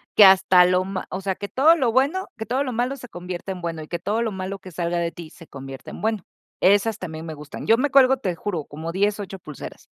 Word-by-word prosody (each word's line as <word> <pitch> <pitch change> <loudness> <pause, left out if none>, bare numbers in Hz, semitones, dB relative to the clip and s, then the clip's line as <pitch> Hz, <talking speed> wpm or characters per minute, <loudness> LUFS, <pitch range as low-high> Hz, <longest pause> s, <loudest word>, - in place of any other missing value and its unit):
que 210 - +9
hasta 185 -1 +7
lo 180 +1 +2
ma 190 0 -4
o 185 - -4
sea, 190 -1 -1
que 200 - -6
todo 305 +9 +5
lo 255 -8 +1
bueno, 285 +10 +1
que 220 - -5
todo 260 +4 0
lo 260 - -3
malo 245 +4 -1
se 245 -2 -10
convierte 180 -1 -6
en 185 -1 -6
bueno, 165 -2 -4
y 155 - -12
que 170 - -4
todo 215 +6 -1
lo 220 - -1
malo 190 +1 -4
que 190 -1 -12
salga 170 0 -2
de 170 -1 -1
ti 170 -2 -10
se 165 - -15
convierte 135 -2 -9
en - - -9
bueno. 215 -3 -1 0.4
Esas 205 +3 +3
también 160 -3 -7
me 160 - -6
gustan. 145 0 -9
Yo 225 - +6
me 280 +3 0
cuelgo, 265 -1 +6
te 190 -8 -2
juro, 170 -5 -4
como 160 +3 -6
10, 205 +3 +1
8 195 -1 -6
pulseras. 155 -5 -10
190 Hz, 265 wpm, -23 LUFS, 170-225 Hz, 0.4 s, que